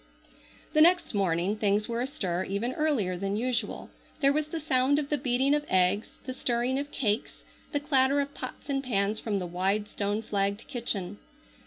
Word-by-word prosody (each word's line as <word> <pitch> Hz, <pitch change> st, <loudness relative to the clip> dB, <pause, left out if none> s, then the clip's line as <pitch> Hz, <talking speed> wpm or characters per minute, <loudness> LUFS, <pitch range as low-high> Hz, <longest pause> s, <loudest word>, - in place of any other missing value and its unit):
The 310 Hz, -, +5 dB
next 350 Hz, -2 st, +4 dB
morning 190 Hz, 0 st, +1 dB
things 210 Hz, 0 st, +1 dB
were 235 Hz, 0 st, -2 dB
astir 190 Hz, -, -2 dB
even 205 Hz, +6 st, -2 dB
earlier 260 Hz, -13 st, +1 dB
than 195 Hz, +2 st, -2 dB
usual. 245 Hz, +1 st, -2 dB, 0.3 s
There 275 Hz, -1 st, +4 dB
was 305 Hz, 0 st, 0 dB
the 325 Hz, +1 st, -4 dB
sound 270 Hz, -1 st, +3 dB
of 290 Hz, -1 st, -2 dB
the 295 Hz, -, +1 dB
beating 260 Hz, +1 st, +2 dB
of 295 Hz, 0 st, +1 dB
eggs, 185 Hz, +3 st, +2 dB
the 255 Hz, -, -4 dB
stirring 250 Hz, +1 st, 0 dB
of 285 Hz, +1 st, -4 dB
cakes, 215 Hz, -5 st, -2 dB, 0.3 s
the 290 Hz, -, 0 dB
clatter 280 Hz, -1 st, +3 dB
of 285 Hz, 0 st, -2 dB
pots -, -, -7 dB
and 275 Hz, -1 st, -1 dB
pans 210 Hz, -3 st, 0 dB
from 210 Hz, -3 st, -2 dB
the 185 Hz, -, -2 dB
wide, 190 Hz, +4 st, 0 dB
stone 205 Hz, +2 st, -2 dB
flagged 200 Hz, 0 st, -1 dB
kitchen. 210 Hz, -7 st, -3 dB
235 Hz, 180 wpm, -28 LUFS, 200-275 Hz, 0.3 s, The